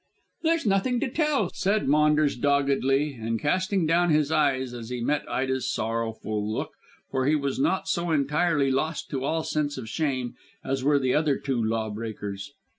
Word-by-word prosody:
"There's 330 -2 +1
nothing 210 +5 +2
to 285 - 0
tell," 290 - +1
said 200 0 0
Maunders 150 0 +3
doggedly, 140 +1 +1
and 115 -2 -3
casting 185 - +1
down 170 +2 +3
his 150 -1 +2
eyes 130 -5 +1
as 115 -1 -7
he 125 -1 -3
met 145 +5 -1
Ida's 130 0 -1
sorrowful 110 -2 -2
look, - - -3 0.4
for 130 0 0
he 155 - +4
was 140 -3 -1
not 185 +7 +1
so 175 -2 -1
entirely 150 -1 +2
lost 150 +4 -2
to 135 -3 -2
all 160 +3 0
sense 145 -2 -1
of 120 -4 -6
shame 130 0 -2 0.3
as 135 0 -2
were 145 +1 +4
the 130 -2 +1
other 150 -2 +2
two 130 -5 -1
law 110 0 -1
breakers. 105 0 -6
140 Hz, 175 wpm, -26 LUFS, 125-160 Hz, 0.4 s, he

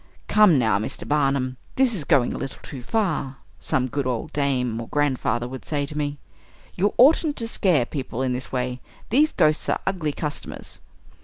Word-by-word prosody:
"Come, 210 -8 +6
now, 110 -5 +2
Mr. 110 - -5
Barnum 135 -3 +1 0.2
this 260 -2 +3
is 170 -9 -3
going 135 -6 +3
a - - -4
little 135 - -5
too 135 - -8
far!" 145 - -1 0.2
some 130 - 0
good 135 +1 -2
old 120 -3 -3
dame 125 -5 0
or 115 - -7
grandfather 130 -5 0
would 130 0 -8
say 145 -2 -1
to 150 - -8
me. 145 -1 -2 0.6
"You 200 +3 0
oughtn't 295 +3 +5
to 230 - -3
scare 180 - +2
people 130 -2 -4
in 130 -1 0
this 125 +1 -5
way. 125 -1 -2 0.3
These 300 +6 +4
ghosts 155 0 +2
are - - +1
ugly 180 -6 -1
customers!" 150 0 -6
140 Hz, 180 wpm, -24 LUFS, 130-175 Hz, 0.6 s, Come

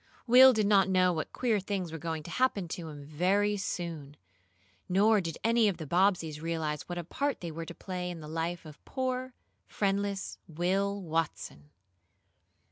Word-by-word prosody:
Will 255 +2 +9
did 215 -4 +1
not 195 -2 +4
know 185 -1 +3
what 160 - -3
queer 230 -5 +1
things 190 -3 -3
were 165 - -6
going 160 0 -4
to 170 - -9
happen 250 -8 +1
to 165 0 -5
him 145 -2 -9
very 190 +7 +1
soon, 165 -7 -5 0.7
nor 205 +3 +4
did 165 -3 -5
any 230 -1 +4
of 195 -5 0
the 160 - -6
Bobbseys 170 -2 +1
realize 160 -2 -3
what 175 - -4
a 175 - -3
part 280 - -2
they 170 -2 -5
were 165 +1 -6
to 170 - -8
play 180 -2 -5
in 175 -2 -6
the 155 - -9
life 165 +2 -3
of 150 -1 -13
poor, 255 -1 -3 0.3
friendless 200 -1 -1
Will 190 +5 0
Watson. 160 - -3
180 Hz, 175 wpm, -30 LUFS, 160-205 Hz, 0.7 s, Will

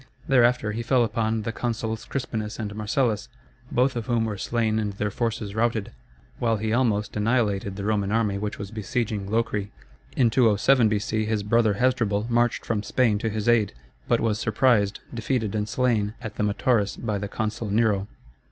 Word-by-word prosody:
Thereafter, 125 -4 +3
he 110 +2 -3
fell 125 +1 +3
upon 110 -1 -1
the 115 - -2
consuls 115 -2 -3
Crispinus 110 -5 -4
and 105 -2 -4
Marcellus, 110 +1 -1 0.4
both 130 +2 +2
of 115 -2 -4
whom 115 -2 +1
were 110 -2 -3
slain 110 +1 0
and 105 -2 -2
their 105 +1 -2
forces 110 -2 -2
routed, 110 -1 0 0.5
while 115 -2 +1
he 110 +1 -1
almost 110 -3 +1
annihilated 105 -3 0
the 100 - -5
Roman 105 -1 0
army 105 -3 +1
which 105 0 -4
was 100 0 -7
besieging 110 -2 -2
Locri. 105 -2 -1 0.5
In 120 -3 +4
207 115 +1 +4
B.C. 110 +1 -1
his 105 -1 -1
brother 110 0 +3
Hasdrubal 115 -3 +1
marched 120 +1 +1
from 110 -3 -1
Spain 110 -1 +1
to 110 - -1
his 110 0 -3
aid, 115 -4 +3 0.3
but - - +3
was 110 -2 0
surprised, 110 -3 +2
defeated, 115 -2 -1
and 105 -1 -2
slain 115 -4 +1
at 110 - -6
the - - -3
Metaurus 105 0 +1
by 105 -4 -2
the 100 - -3
consul 110 +1 -3
Nero. 105 -2 +2
110 Hz, 175 wpm, -25 LUFS, 105-115 Hz, 0.5 s, In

